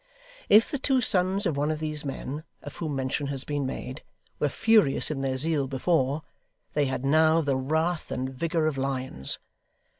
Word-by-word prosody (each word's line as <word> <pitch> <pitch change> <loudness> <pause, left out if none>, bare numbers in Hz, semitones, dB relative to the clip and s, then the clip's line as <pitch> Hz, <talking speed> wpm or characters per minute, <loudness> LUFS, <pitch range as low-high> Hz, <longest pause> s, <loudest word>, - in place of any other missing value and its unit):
If 220 +7 +6
the 285 - -2
two 270 -1 +2
sons 195 -2 +1
of 165 -5 0
one 145 +2 0
of 155 - -1
these 155 -1 -2
men, 145 +1 -5 0.2
of - - -9
whom 155 -4 -3
mention 135 +2 -2
has 135 -1 0
been 145 -2 -2
made, 130 +1 -6 0.4
were 150 - +1
furious 215 -8 +3
in 140 -3 -3
their 135 -1 -1
zeal 150 -1 +3
before, 140 +1 0 0.5
they 145 - +2
had 130 0 -3
now 160 +3 +4
the 140 -3 0
wrath 160 +5 -1
and 130 0 -2
vigour 165 +3 -1
of 150 -3 -1
lions. 130 - 0
150 Hz, 180 wpm, -27 LUFS, 135-165 Hz, 0.5 s, If